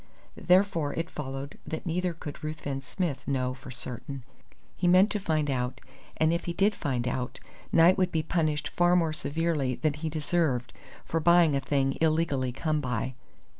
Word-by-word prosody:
Therefore 180 -5 +2
it 165 0 -3
followed 135 0 -6
that 160 - -4
neither 180 +1 0
could 150 -2 -8
Ruthven 145 -3 -4
Smith 155 0 -3
know 130 -2 0
for 130 +1 -12
certain. 125 +1 -6 0.5
He 180 - 0
meant 185 +4 +6
to 210 - -1
find 155 -6 0
out, 125 -2 -1 0.4
and 160 +1 +3
if 170 - -2
he 175 - -2
did 200 +4 +3
find 125 -8 -2
out, 125 0 -3 0.3
Knight 170 +3 +6
would 185 -1 +2
be 160 -1 0
punished 155 -3 0
far 175 0 +3
more 165 -3 +2
severely 155 -4 -1
than 155 +2 0
he 155 +2 -4
deserved 150 -6 0 0.3
for 165 - -1
buying 170 -2 +5
a 135 - +1
thing 135 0 0
illegally 155 -5 +1
come 155 +4 -1
by. 125 0 -2
155 Hz, 170 wpm, -28 LUFS, 135-170 Hz, 0.5 s, meant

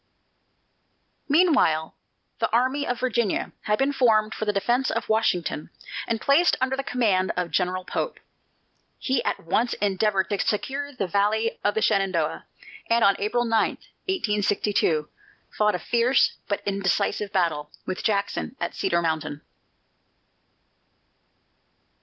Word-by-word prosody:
Meanwhile 285 - +3 0.4
the - - +1
Army 260 +4 +1
of 245 -1 -2
Virginia 235 -5 0
had 210 0 +2
been 275 +3 +1
formed 220 -5 +3
for 215 - -4
the 210 - +2
defence 240 +6 +1
of - - -2
Washington, 180 -8 0 0.4
and 230 -1 -1
placed 285 +9 +3
under 260 +1 0
the 270 - -2
command 205 -8 +1
of 175 -2 -1
General 185 0 0
Pope. - - -3 0.8
He 260 -2 0
at - - -2
once 225 +8 0
endeavored 195 -1 +1
to 200 - 0
secure 275 +7 -2
the 250 -8 -3
valley 210 +4 0
of 205 - +1
the 220 - +1
Shenandoah, 190 -7 0 0.4
and 230 0 +3
on 200 - +6
August 210 +3 -3
9, 240 - +4 0.3
1862, 205 - -1 0.5
fought 210 -2 +2
a - - 0
fierce 240 +6 +2
but 200 - -2
indecisive 200 +1 0
battle 165 -6 0 0.2
with 185 - -4
Jackson 205 +4 -1
at - - -3
Cedar 170 0 0
Mountain. 160 -2 -2
210 Hz, 130 wpm, -25 LUFS, 185-245 Hz, 0.8 s, on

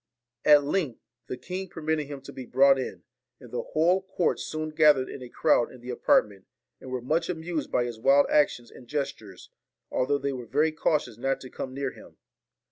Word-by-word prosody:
At 150 -1 +7
length 145 -5 -1 0.3
the 125 - -5
king 185 +7 -6
permitted 155 -3 -2
him 140 -1 -7
to 135 - -11
be 130 -2 -8
brought 135 +1 +5
in; 130 - -5 0.4
and 125 -4 -14
the 120 - -2
whole 175 +8 +2
court 190 -2 -1
soon 155 0 -4
gathered 150 -4 +4
in 135 - -8
a 125 - -9
crowd 120 - +2
in 130 - -13
the 125 +1 -6
apartment, 100 -5 +1 0.3
and 130 - -10
were 130 -1 -4
much 155 +6 0
amused 165 -3 -3
by 125 - +2
his 120 -2 -5
wild 135 +4 +5
actions 145 -5 +1
and 125 - -14
gestures, 135 -9 -5 0.4
although 140 +3 +1
they 140 0 -2
were 125 -2 -7
very 150 +6 +2
cautious 155 -4 -1
not 135 +2 0
to 130 - -10
come 130 0 -6
near 135 -1 -2
him. - - -16
140 Hz, 200 wpm, -27 LUFS, 125-155 Hz, 0.4 s, At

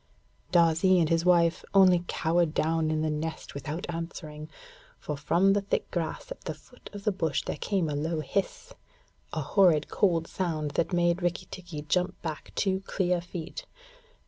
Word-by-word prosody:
Darzee 170 +2 +4
and 160 -2 +2
his 165 +1 +2
wife 170 -1 +4
only 185 -3 +6
cowered 165 0 +1
down 160 0 +1
in 155 0 0
the 155 - +1
nest 160 +2 -4
without 145 +4 -5
answering, 160 -2 -6 0.5
for 150 - -4
from 170 +7 +3
the 205 - +2
thick 195 - -2
grass 175 - -3
at - - -7
the - - -5
foot - - -16
of 205 -1 -8
the 210 - +2
bush 160 -7 -1
there - - -4
came 190 -5 0
a 150 - -2
low 160 +3 -1
hiss 200 - -3 0.6
a - - -2
horrid 175 -7 +3
cold 170 -5 +2
sound 160 -6 -2
that 170 +6 0
made 175 0 +2
Rikki 175 -1 -1
tikki 170 -5 -7
jump 180 +4 0
back 160 -3 -5
two 190 -2 +1
clear 180 -2 +1
feet. 175 - -7
170 Hz, 170 wpm, -28 LUFS, 155-185 Hz, 0.6 s, only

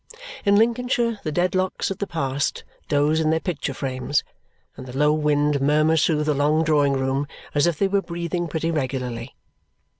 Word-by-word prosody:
In 200 0 +5
Lincolnshire 235 0 +1
the 155 - -2
Dedlocks 185 +4 0
of 195 - -5
the 200 - -2
past 140 -5 -2 0.2
doze 150 +2 +2
in 155 -1 +1
their 160 0 +2
picture 155 -6 -3
frames, 130 +2 -1 0.5
and 130 - -10
the 125 +1 -7
low 150 +1 +4
wind 150 -1 +1
murmurs 155 +3 +3
through 150 -2 +2
the 150 0 +1
long 150 +3 +2
drawing 145 -3 +3
room 135 +1 -1 0.3
as 145 +3 +3
if 170 -3 0
they 195 - +2
were 200 0 +1
breathing 170 -1 -3
pretty 165 +1 -2
regularly. 130 -5 -3
155 Hz, 175 wpm, -23 LUFS, 140-175 Hz, 0.5 s, In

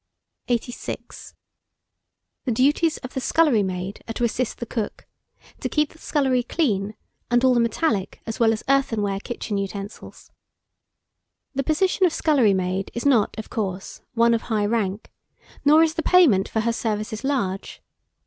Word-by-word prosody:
86. 245 0 -4 1.1
THE 255 - 0
DUTIES 290 +7 +2
OF 255 - -7
THE 265 - -2
SCULLERY 290 -5 +3
MAID 190 +1 -4
are - - -2
to - - -2
assist 235 +1 -1
the 235 - -5
cook; 225 -2 -4 0.5
to - - -3
keep 300 -1 +1
the 320 - -18
scullery 265 -6 +1
clean, 215 - -1 0.3
and 240 +1 +3
all 260 -1 +5
the 240 - +3
metallic 230 - 0
as 225 - -5
well 225 -1 +5
as 220 - -3
earthenware 225 -8 +1
kitchen 210 -2 -4
utensils. 200 +1 -7 1.2
The 275 - 0
position 365 +6 +2
of 330 - -3
scullery 255 -11 +3
maid 185 +1 -1
is 235 - -3
not, 245 -7 +3
of 220 - -7
course, 195 -4 -4
one 235 0 +4
of 230 - +1
high 215 -2 +1
rank, 205 -2 -1 0.5
nor 305 +3 +6
is 320 -1 +1
the 325 - -2
payment 295 - +4
for 220 - 0
her 235 +1 0
services 215 -1 -3
large. 200 -9 -2
235 Hz, 160 wpm, -23 LUFS, 205-275 Hz, 1.2 s, nor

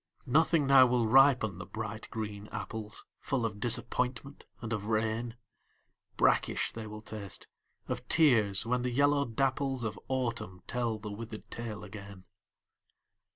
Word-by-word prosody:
Nothing 155 +2 +3
now 135 -2 +7
will 120 -1 +2
ripen 125 -6 +5
the 90 - -6
bright 110 +1 -5
green 105 -2 -5
apples, 110 -1 -6
Full 130 -4 -1
of 105 -2 -4
disappointment 125 +4 -1
and 115 0 -4
of 105 -2 -3
rain, 115 +1 -1 0.8
Brackish - - +2
they 110 -1 -7
will 105 0 -9
taste, 100 -4 -7 0.4
of - - -4
tears, 115 - +4
when 125 +1 0
the 125 - -1
yellow 140 +3 +3
dapples 135 +1 0
Of 110 - -3
Autumn 115 -8 -3
tell 120 -3 -1
the 105 0 -7
withered 110 +1 -8
tale 110 -3 -6
again. 100 -2 -10
115 Hz, 140 wpm, -31 LUFS, 105-130 Hz, 0.8 s, now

